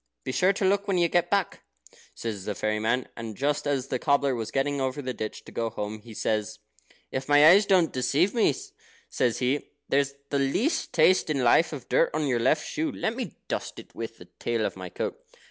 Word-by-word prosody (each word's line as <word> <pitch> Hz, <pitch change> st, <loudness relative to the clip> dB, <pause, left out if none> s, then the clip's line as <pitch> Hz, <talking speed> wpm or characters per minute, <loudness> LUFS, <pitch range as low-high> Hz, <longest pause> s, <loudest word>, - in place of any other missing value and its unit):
"Be -, -, -3 dB
sure 185 Hz, +8 st, +3 dB
to 195 Hz, -, -1 dB
look 200 Hz, +2 st, +2 dB
when 195 Hz, -2 st, +1 dB
you 170 Hz, -1 st, +4 dB
get 175 Hz, +1 st, +1 dB
back," 200 Hz, -2 st, 0 dB, 0.5 s
says 105 Hz, -4 st, -5 dB
the 105 Hz, -, -3 dB
fairy 110 Hz, +1 st, -1 dB
man. 120 Hz, +4 st, 0 dB
And 110 Hz, -2 st, -7 dB
just 145 Hz, +1 st, 0 dB
as 135 Hz, -2 st, -1 dB
the 130 Hz, -, -1 dB
cobbler 140 Hz, -1 st, +2 dB
was 115 Hz, -3 st, -3 dB
getting 140 Hz, +1 st, 0 dB
over 130 Hz, +1 st, -2 dB
the 130 Hz, -2 st, -3 dB
ditch 110 Hz, -2 st, -6 dB
to -, -, -11 dB
go 115 Hz, -1 st, -2 dB
home, 105 Hz, 0 st, -5 dB
he 110 Hz, 0 st, -12 dB
says: 110 Hz, 0 st, -1 dB, 0.5 s
"If 130 Hz, +1 st, -4 dB
my 145 Hz, +1 st, +7 dB
eyes 200 Hz, +5 st, +7 dB
don't 180 Hz, -5 st, +3 dB
deceive 145 Hz, +9 st, +1 dB
me," 220 Hz, -, +3 dB, 0.6 s
says 120 Hz, -2 st, +1 dB
he, 130 Hz, +3 st, -1 dB, 0.2 s
"there's 140 Hz, 0 st, +1 dB, 0.2 s
the 140 Hz, -, +1 dB
least 225 Hz, -, 0 dB
taste 175 Hz, +1 st, +4 dB
in 140 Hz, -4 st, 0 dB
life 160 Hz, +7 st, +4 dB
of 140 Hz, -6 st, -7 dB
dirt -, -, +3 dB
on 155 Hz, -1 st, 0 dB
your 125 Hz, -4 st, +1 dB
left 140 Hz, +6 st, +2 dB
shoe. 315 Hz, -1 st, -2 dB
Let 225 Hz, -3 st, -2 dB
me 255 Hz, -, -5 dB
dust -, -, -4 dB
it -, -, -12 dB
with -, -, -6 dB
the -, -, -13 dB
tail -, -, 0 dB
of -, -, -3 dB
my -, -, -7 dB
coat." 480 Hz, -, -5 dB
140 Hz, 220 wpm, -27 LUFS, 120-175 Hz, 0.6 s, my